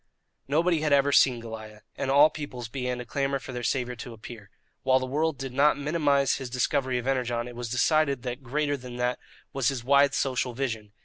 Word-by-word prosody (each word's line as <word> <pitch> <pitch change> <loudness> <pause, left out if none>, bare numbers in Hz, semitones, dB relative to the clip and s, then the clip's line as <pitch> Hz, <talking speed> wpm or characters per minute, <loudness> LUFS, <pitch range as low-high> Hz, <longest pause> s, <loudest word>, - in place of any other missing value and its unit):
Nobody 160 +3 +2
had 155 -1 0
ever 140 0 +4
seen 130 -3 +4
Goliah, 110 -2 -9
and 135 - -3
all 145 +3 +6
peoples 125 -6 -7
began 125 0 -3
to 125 - -6
clamour 140 +2 -1
for 135 - -9
their 125 -1 -5
saviour 125 0 -1
to 120 +1 -8
appear. 110 -2 -11 0.3
While 130 0 +3
the 130 - -2
world 150 +3 -1
did 135 -1 -6
not 140 +2 +4
minimize 145 -2 +1
his 130 -2 -6
discovery 130 +1 0
of 125 - -4
Energon, 125 -3 -1
it 120 - -9
was 120 -1 -5
decided 140 +1 +2
that 125 +1 -4
greater 145 +3 -1
than 125 -1 -9
that 125 0 -1 0.3
was 135 -3 0
his 135 -4 -1
wide 140 +2 +4
social 130 -2 -1
vision. 115 -6 -4
130 Hz, 205 wpm, -27 LUFS, 120-140 Hz, 0.3 s, all